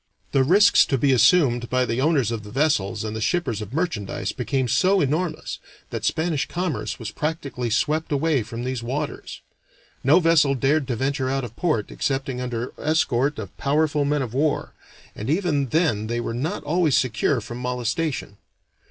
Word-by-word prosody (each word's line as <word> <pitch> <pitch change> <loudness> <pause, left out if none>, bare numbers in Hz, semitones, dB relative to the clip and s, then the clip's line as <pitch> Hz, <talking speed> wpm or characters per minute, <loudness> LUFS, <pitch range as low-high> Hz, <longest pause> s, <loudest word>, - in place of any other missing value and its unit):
The 135 - +3
risks 200 - +6
to 135 - +1
be 135 +1 +3
assumed 120 -4 +4
by 130 0 +2
the 115 +2 -1
owners 140 -6 +2
of 115 -2 -3
vessels 110 -2 0
and 110 0 -4
the 110 - -4
shippers 120 - 0
of 105 0 -7
merchandise 150 - -2
became 130 -2 -1
so 190 - +3
enormous 155 +3 -1 0.3
that - - -4
Spanish 160 -3 0
commerce 175 -4 -3
was 110 -2 -6
practically 140 -5 -3
swept 155 +8 0
away 145 -1 +2
from 115 +2 -6
these 130 -1 -3
waters. 140 +5 -5 0.6
No 145 +7 +6
vessel 160 -5 +4
dared 140 +2 +1
to 125 - -1
venture 135 +2 -1
out 135 0 -1
of 120 -2 -7
port 150 - -1
excepting 135 -2 -2
under 120 -1 -4
escort 145 -3 +1
of 100 -4 -7
powerful 150 +1 +1
men 145 0 +1
of 120 -3 -6
war, 145 +2 0 0.4
and 110 +5 -5
even 155 -5 +1
then 120 -7 +1
they 120 +1 -2
were 115 -1 -3
not 155 - -3
always 155 -1 +2
secure 130 +1 +1
from 120 +2 -8
molestation. 125 -1 -2
135 Hz, 170 wpm, -23 LUFS, 120-155 Hz, 0.6 s, risks